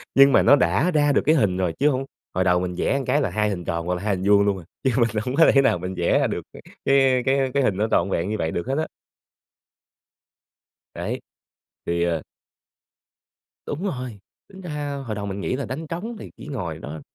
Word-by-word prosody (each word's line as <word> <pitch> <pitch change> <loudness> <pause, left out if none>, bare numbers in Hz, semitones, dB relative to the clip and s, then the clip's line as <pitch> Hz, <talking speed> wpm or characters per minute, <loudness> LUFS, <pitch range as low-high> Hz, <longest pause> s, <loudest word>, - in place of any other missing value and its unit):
Nhưng 140 0 +7
mà - - +6
nó - - +7
đã 105 - +2
ra 145 -3 +3
được 140 - +3
cái 155 - +5
hình 100 - +2
rồi 90 -3 0
chứ 145 - +4
hông 135 -1 -1 0.3
hồi 95 - +1
đầu 90 -1 +3
mình 90 0 -3
vẽ 140 +9 0
cái 150 - +2
là 135 - 0
2 105 +3 0
hình 90 -4 -4
tròn 85 0 -2
hoặc 90 - 0
là 90 - -6
2 105 -2 +1
hình 95 +1 -4
vuông 100 0 +5
luôn 100 -1 +1
à, - - -12 0.2
chứ 130 - +2
mình 120 -2 +3 0.2
hông 125 - -2
có 165 +2 +6
thể 135 - +6
nào 90 - +2
mình 90 +2 -5
vẽ 85 - +2
ra - - +2
được - - -3 0.4
cái 135 -2 +4
cái 135 -1 +2
cái 140 -1 +2
hình 95 -6 +1
nó 105 +2 +1
trọn 85 - +2
vẹn 90 0 -1
như 110 - -1
vậy 80 - -1
được 85 - -3
hết 135 +2 -1
á. 160 - -1 2.1
Đấy, - - -4 0.7
thì, 85 0 0
ờ 85 -3 -1 1.4
Đúng 150 - -4
rồi, 125 - -4 0.3
tính 190 -1 -13
ra 145 -5 -4
hồi 110 - -3
đầu 105 -1 -4
mình 100 0 -4
nghĩ 125 - -1
là 140 - -3
đánh 145 +6 -5
trống 195 +9 -5
thì - - -9
chỉ - - -11
ngồi 90 - -4
đó 80 0 -7
115 Hz, 235 wpm, -23 LUFS, 90-140 Hz, 2.1 s, Nhưng